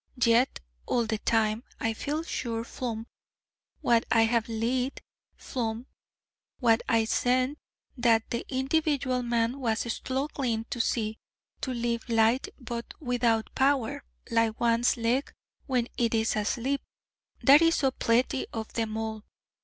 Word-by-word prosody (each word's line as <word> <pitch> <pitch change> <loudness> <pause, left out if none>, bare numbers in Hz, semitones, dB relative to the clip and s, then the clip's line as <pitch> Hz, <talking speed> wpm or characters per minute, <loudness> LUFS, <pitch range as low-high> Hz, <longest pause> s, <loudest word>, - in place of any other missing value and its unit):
Yet 235 +3 +3 0.3
all 240 -1 +1
the 220 -1 -2
time, 220 +1 +1 0.2
I 225 0 0
feel 295 +7 -3
sure 230 -8 -3
flom 230 -2 -4 0.8
what 235 -1 +3
I 225 -1 +5
have 230 0 +1
lead, 245 +4 -1 0.4
flom 230 -1 -3 0.7
what 230 -2 +3
I 225 -1 +3
scent, 255 +5 +1 0.4
that 230 -2 +3
the 235 - -1
individual 270 -1 +1
man 235 +2 0
was 225 -4 0
stluggling 260 -4 -2
to 240 - -3
see, 220 -2 -1 0.4
to 260 - -2
live 235 -1 -2
light, 225 +3 +3
but 235 -2 -6
without 240 -5 0
power, 265 -3 +1 0.3
like 230 -1 +2
one's 235 +1 +3
leg 240 +4 0 0.4
when 250 -3 +1
it 235 -1 +2
is 225 0 +1
asleep: 245 +6 -1 0.6
that 285 +3 +8
is 330 0 +4
so 270 -2 +2
pletty 250 +2 +1
of 220 -1 -5
them 220 -1 -2
all! 220 -1 -4
235 Hz, 135 wpm, -28 LUFS, 225-255 Hz, 0.8 s, that